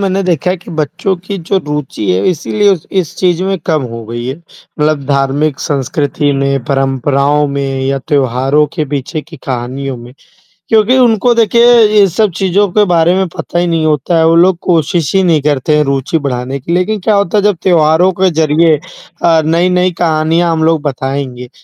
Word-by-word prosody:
मैंने 195 0 0
देखा 180 -1 0
है 185 - -1
कि 175 - -13
बच्चों 170 +6 -1
की 200 - -3
जो 185 +3 -1
रुचि 150 -9 -3
है 90 +2 0
इसीलिए 205 +5 0
उस 165 -5 -5
इस 165 - -7
चीज़ 180 -1 0
में 195 -1 -1
कम 155 -4 +1
हो 115 -1 -7
गई 120 +1 -6
है, 135 +3 -4
मतलब 155 -3 -4
धार्मिक 140 +1 0
संस्कृति 145 +1 -1
में, 140 -2 -1
परंपराओं 140 +2 0
में 140 -1 -3
या 135 0 -1
त्योहारों 135 +1 +1
के 155 -3 -1
पीछे 145 +4 -4
की 165 -1 -13
कहानियों 130 +1 -4
में, 120 +1 -12 0.6
क्योंकि 225 +3 +3
उनको 240 -1 +3
देखिए 235 +2 +4 0.2
ये 200 - +5
सब 195 +2 0
चीज़ों 195 +1 +1
के 210 +3 +3
बारे 165 +1 +3
में 190 -1 0
पता 175 +1 -4
ही 175 - 0
नहीं 165 -2 0
होता 155 +2 0
है। 160 - +3
वो 165 - +3
लोग 180 +1 +4
कोशिश 165 -1 0
ही 190 - +3
नहीं 160 -5 +2
करते 150 +1 0
हैं 150 - +3
रूचि 140 +2 -1
बढ़ाने 130 0 -3
की 165 +6 -4
लेकिन 200 +4 0
क्या 210 +3 +1
होता 200 0 +1
है 205 - +1
जब 205 -3 +2
त्योहारों 170 0 +3
के 190 - +4
ज़रिए 155 +1 +3 0.5
अ, 165 -2 +4
नई-नई 180 +2 +1
कहानियाँ 165 +1 +1
हम 160 -1 0
लोग 160 -2 +2
बताएँगे, 135 -3 -4
155 Hz, 190 wpm, -12 LUFS, 140-180 Hz, 0.6 s, ये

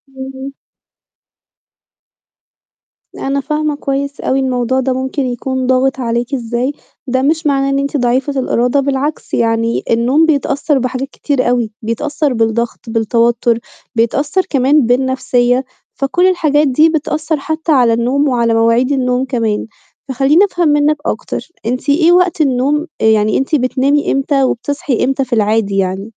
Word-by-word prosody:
اهم. 265 +1 -7 2.6
لا، - - -6
أنا 275 +1 0
فاهمة 300 +1 -1
كويس 280 0 -3
أوي 265 - 0
الموضوع 260 -1 0
ده 260 0 0
ممكن 265 +2 -3
يكون 255 +1 -3
ضاغِط 260 +1 +1
عليكِ 240 +2 -2
إزاي، 245 +2 -2 0.3
ده 260 0 0
مش 310 +3 +1
معناه 275 -1 +1
إن 275 - +1
أنتِ 280 +1 -1
ضعيفة 260 +2 0
الإرادة، 250 +1 +1
بالعكس 280 +2 -2
يعني 230 0 0
النوم 250 +7 +3
بيتأثّر 290 -1 0
بحاجات 255 +1 -3
كتير 275 -4 -1
أوي 240 -3 0
بيتأثّر 280 +5 -2
بالضغط، 225 +1 -1
بالتوتّر، 230 +1 +1 0.4
بيتأثّر 280 - +1
كمان 275 0 +3
بالنَفْسيّة، 250 0 +1 0.3
فكل 350 +7 +1
الحاجات 305 -5 +2
دي 305 +5 +4
بتأثّر 310 0 -1
حتى 315 +3 -2
على 245 -5 +4
النوم 255 +5 +1
وعلى 235 -3 +1
مواعيد 230 +3 +2
النوم 255 -1 0
كمان، 230 -5 -2 0.4
فخلّيني 275 - +3
أفهم 350 -4 -1
منِّك 295 +1 +2
أكتر، - - -4 0.2
أنتِ 250 +4 -2
إيه 325 +4 +4
وقت 360 -2 +3
النوم 285 +3 +1
آآ - - +2
يعني 215 -1 +3
أنتِ 270 +4 0
بتنامي 275 +2 +1
إمتى 275 0 +1
وبتصحي 265 +1 -1
إمتى 270 +1 0
في 250 - -5
العادي 210 -2 +1
يعني؟ 195 +3 -2
265 Hz, 140 wpm, -15 LUFS, 240-285 Hz, 2.6 s, دي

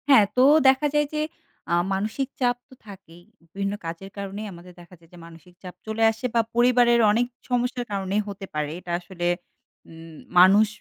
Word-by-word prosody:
হ্যাঁ, 260 -7 +7
তো 250 - +4 0.2
দেখা 265 +2 +4
যায় 295 0 +2
যে 305 - -1 0.5
আ - - +2 0.2
মানসিক 215 +7 -2
চাপ 245 -1 +2
তো - - -16
থাকেই। 185 -4 -13 0.3
বিভিন্ন 195 0 -2
কাজের 165 +4 -7
কারণেই 200 +2 -6
আমাদের 175 +1 -13
দেখা 175 +1 -16
যায় 165 -1 -23
যে - - -13
মানসিক 165 +2 -16
চাপ 180 -1 -9
চলে 220 +1 -1
আসে 225 +3 -8
বা 230 - +5
পরিবারের 240 0 +4
অনেক 235 +3 +2 0.2
সমস্যার 245 0 -1
কারনেই 195 +1 -1
হতে 200 -1 -7
পারে। 150 -1 -2
এটা 180 - -8
আসলে 175 -1 -5 0.6
উম 165 0 -12 0.2
মানুষ 200 +4 +7
200 Hz, 180 wpm, -24 LUFS, 180-240 Hz, 0.6 s, হ্যাঁ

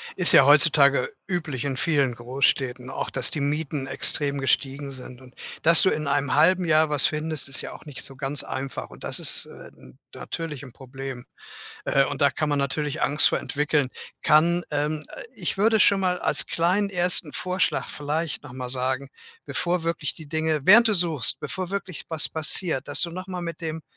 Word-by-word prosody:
ist - - +4
ja - - +7
heutzutage 480 -2 +4
üblich 160 - -4
in 140 -2 -3
vielen 140 -4 0
Großstädten 125 +1 -2
auch, - - -5
dass - - +3
die 150 - -3
Mieten 145 -1 -3
extrem 140 +1 -1
gestiegen 135 +1 -2
sind. 125 -1 -12
Und 130 -1 -18 0.3
dass 165 0 +6
du - - +3
in 150 -4 -3
einem 140 -1 -1
1/2 180 +5 +3
Jahr 155 -2 +2
was 150 -2 +4
findest, 155 -2 -2
ist 135 - -1
ja - - -7
auch - - -13
nicht 145 -3 -9
so 135 - -10
ganz 135 +2 -1
einfach. 135 +1 -6
Und - - -15
das - - -1
ist, - - +3
äh, - - -13
n 65 - -18
natürlich 155 -5 -7
'n 130 - -12
Problem, 130 0 -9 0.6
äh, 135 - +2
und - - -5
da 140 -1 +4
kann 155 0 -3
man 145 - 0
natürlich 145 +2 -3
Angst 150 +2 +4
vor - - -1
entwickeln. 150 -2 -1 0.3
Kann, 170 +4 +3
ähm 150 +1 -2
äh, - - -9
ich - - -4
würde 220 +1 +3
schon 200 -1 +4
mal 180 -1 0
als - - +1
kleinen 185 +5 0
1. 175 -4 +3
Vorschlag 185 0 -2
vielleicht 150 +2 -4
noch 145 -4 -13
mal 125 -1 -7
sagen, 130 +1 -2 0.4
bevor 175 -1 -2
wirklich 165 -3 -3
die 160 - -12
Dinge 160 0 -1
während 225 +7 +8
du 215 - +2
suchst, 165 - +2
bevor 170 +5 -6
wirklich 195 -3 -5
was 160 -2 +5
passiert, 160 -1 +3
dass 145 - +4
du 170 - +3
noch 185 +2 -8
mal 180 -1 -6
mit 170 0 -7
dem 160 -1 -6
150 Hz, 200 wpm, -23 LUFS, 135-170 Hz, 0.6 s, während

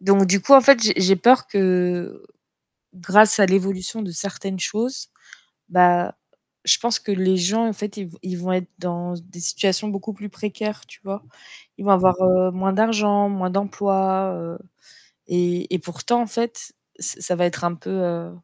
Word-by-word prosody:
donc 195 +1 +4
du 195 +2 +2
coup 280 - +2
en 275 - +12
fait, 265 -2 +6
j'ai 210 -3 +3
j'ai 190 +1 +4
peur 250 +7 +5
que 180 - -1 0.7
grâce 205 +4 +4
à 200 - +6
l'évolution 195 +2 -1
de 195 -4 -5
certaines 195 +2 -6
choses, 235 +8 -3 0.6
bah 180 -1 +3 0.5
je - - +4
pense 235 -1 -1
que - - -7
les 190 -1 +1
gens 205 +6 +1
en 225 - -1
fait, 205 0 -7
ils 200 -2 -7
v 170 - -17
ils 185 0 -5
vont 185 +1 -3
être 185 -1 -2
dans 175 -1 -5
s 170 - -10
des 175 -1 -14
situations 190 +6 -1
beaucoup 200 +2 -5
plus 210 +1 -10
précaires, 210 +1 -6
tu - - -18
vois? 195 +1 -7 0.5
Ils 200 - -9
vont 200 - +1
avoir, 185 -1 +5
heu, 185 0 +3
moins 190 +1 -1
d'argent, 210 -1 +2
moins 190 -2 -2
d'emploi, 190 -1 0
heu 170 0 -8 0.7
et 175 0 -1
et - - +1
pourtant 180 +8 -2
en - - -3
fait, 230 +2 -5 0.3
c - - -4
ça 180 - -2
va 175 - +1
être 175 0 -2
un 175 0 -1
peu, 170 - -10
heu, 175 -3 -3
190 Hz, 190 wpm, -21 LUFS, 180-210 Hz, 0.7 s, en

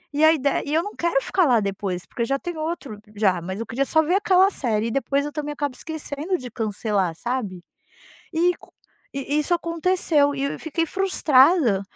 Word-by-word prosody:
e 305 - +2
aí 315 0 +6
de 280 - -1 0.2
e 290 - -4
eu 325 - +2
não 415 - -7
quero 340 -5 +1
ficar 375 - +2
lá 240 -4 +4
depois 195 -3 -3
porque 235 - -4
já 275 +4 0
tenho 345 +1 -6
outro 310 -9 -4 0.2
já, 190 -4 +2
mas 190 +4 -5
eu 230 - -3
queria 245 +5 -1
só 315 +3 +2
ver 335 - 0
aquela 390 0 +4
série 225 -7 -1
e - - -3
depois 275 +2 0
eu 295 - -4
também 295 0 -4
acabo 285 -3 -3
esquecendo 315 +3 -4
de 250 -2 -8
cancelar, 205 -6 -1
sabe, 210 -6 -4 0.7
e 345 +2 +3
co - - -19 0.4
e 275 +1 -3
e - - +4
isso 300 +4 0
aconteceu 335 -4 +1
e 275 - -2
eu 280 - -3
fiquei 330 +1 -1
frustrada 300 - +3
285 Hz, 205 wpm, -23 LUFS, 225-330 Hz, 0.7 s, aí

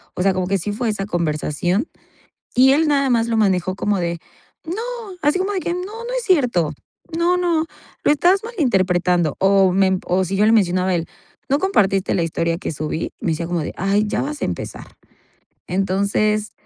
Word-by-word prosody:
O 180 - -1
sea, 195 0 +3
como 185 -1 -1
que 195 +1 +1
sí 205 +5 -3
fue 235 +2 -1
esa 210 -2 -2
conversación 175 - -1 0.7
y 265 +1 +6
él 310 +3 +3
nada 280 -2 +2
más 230 -1 +2
lo 230 - 0
manejó 185 -4 +1
como 205 0 0
de 170 -1 -2 0.5
no, 355 +7 -4 0.4
así 300 +4 +2
como 380 +2 -1
de 385 - -1
que 345 - -2
no, 360 - -3
no 455 +5 -7
es 485 - -4
cierto. 245 - +2 0.4
No, 345 +2 +2
no, 340 -3 +1 0.4
lo - - +4
estás 360 +6 +3
malinterpretando. 185 - +1
O 195 -1 +4
me 195 +1 +3
emp 190 -1 0
O 185 +1 +2
si 190 +2 -3
yo 205 - +3
le - - +5
mencionaba 185 -3 +2
a - - +2
él: 165 -1 -3 0.4
"¿No 280 - +2
compartiste 195 - +2
la 175 - +1
historia 165 0 -1
que 185 - -4
subí?". 155 +1 -3
Me - - -1
decía 165 +2 -3
como 175 0 -1
de - - -5
ay, 200 +3 +1
ya - - -1
vas 295 +1 -5
a - - +1
empezar. - - -5 0.8
Entonces, 200 +3 0
200 Hz, 200 wpm, -20 LUFS, 180-290 Hz, 0.8 s, y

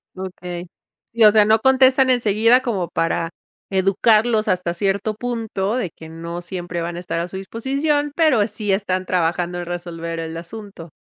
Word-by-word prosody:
Okey. 180 -1 -7 0.5
Sí, 230 -1 +3
o 210 - +9
sea, 215 -1 +5
no 220 +1 +4
contestan 265 +1 +4
enseguida 230 0 +4
como 195 -9 -2
para 165 0 -1 0.4
educarlos 215 +4 +2
hasta 180 -3 0
cierto 200 +4 -1
punto, 225 -3 -2
de 245 -8 -1
que 160 - -12
no 170 +1 -6
siempre 175 -1 -5
van 170 +1 -4
a - - -4
estar 175 -1 -3
a 170 - -2
su 190 +2 -7
disposición, 280 +8 -1
pero 300 -11 +4
sí 210 -1 -3
están 190 -2 0
trabajando 175 0 0
en 175 - -5
resolver 170 -1 -5
el 165 0 -5
asunto. 175 -2 -9
195 Hz, 170 wpm, -21 LUFS, 175-225 Hz, 0.5 s, o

